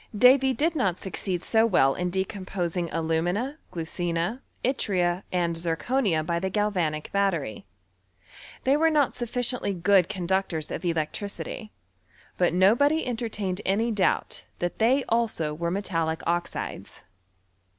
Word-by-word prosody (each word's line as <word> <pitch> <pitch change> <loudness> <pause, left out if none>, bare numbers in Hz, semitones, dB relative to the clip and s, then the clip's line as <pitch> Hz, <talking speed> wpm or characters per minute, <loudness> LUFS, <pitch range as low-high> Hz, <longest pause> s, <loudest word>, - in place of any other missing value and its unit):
Davy 265 +3 +6
did 315 +5 0
not 195 - +1
succeed 185 -1 -3
so 225 -1 +3
well 135 -10 +4
in 180 0 -2
decomposing 185 -2 -2
alumina, 175 - -1
glucina, 170 +6 -2 0.2
yttria, 185 -8 +1
and 170 -2 0
zirconia, 170 +1 0
by 170 +1 0
the 190 +2 -1
gal 210 +2 +1
vanic 155 -5 -2
battery: 165 - -1 1.0
they 270 +2 +4
were 325 +2 +4
not 300 -4 +2
sufficiently 240 -3 -1
good 180 0 +4
con 180 -2 -4
ductors 180 -4 -1
of - - -4
electricity; 185 +6 -3 0.6
but 180 - +2
nobody 235 - +4
entertained 215 -6 -3
any 220 +5 +1
doubt 205 -4 0
that 175 0 -3
they 255 +5 +3
also 220 -10 0
were 170 +2 -2
metallic 165 -4 -1
oxides. 175 +1 -3
190 Hz, 130 wpm, -26 LUFS, 170-230 Hz, 1.0 s, Davy